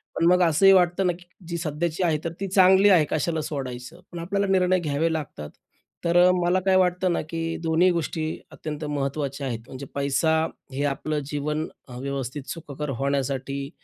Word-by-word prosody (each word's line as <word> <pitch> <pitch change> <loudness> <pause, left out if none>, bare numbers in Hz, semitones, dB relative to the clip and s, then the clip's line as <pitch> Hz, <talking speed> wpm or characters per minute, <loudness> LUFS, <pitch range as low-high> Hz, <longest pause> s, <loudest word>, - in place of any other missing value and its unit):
पण 165 - +1
मग 180 0 +4
असंही 175 +4 +5
वाटतं 180 0 +3
ना, 175 - +2
की 175 +1 -15 0.2
जी 170 0 -3
सध्याची 165 +2 -2
आहे 160 -3 +2
तर 165 - -2
ती 195 - -2
चांगली 190 +1 +6
आहे 170 -6 +5
कशाला 160 0 0
सोडायचं. 135 +2 -6
पण 175 - -6
आपल्याला 200 +4 -1
निर्णय 185 -1 +3
घ्यावे 160 0 0
लागतात. 130 - -5 0.6
तर 170 +1 +3
अ, - - +6
मला 175 +2 +2
काय 190 -1 +4
वाटतं 180 -1 +2
ना, - - 0
की 165 0 -3
दोन्ही 165 +3 +3
गोष्टी 160 -1 -2 0.2
अत्यंत 155 0 -6
महत्त्वाच्या 140 -1 -3
आहेत 115 -3 -3
म्हणजे 135 +1 -8
पैसा 140 +3 +2 0.4
हे 140 +2 -2
आपलं 150 +2 -1
जीवन 150 +2 -2 0.2
अ, 125 -2 -9
व्यवस्थित 135 0 -4
सुखकर 150 -3 -6
होण्यासाठी 140 0 -2
160 Hz, 180 wpm, -25 LUFS, 140-175 Hz, 0.6 s, चांगली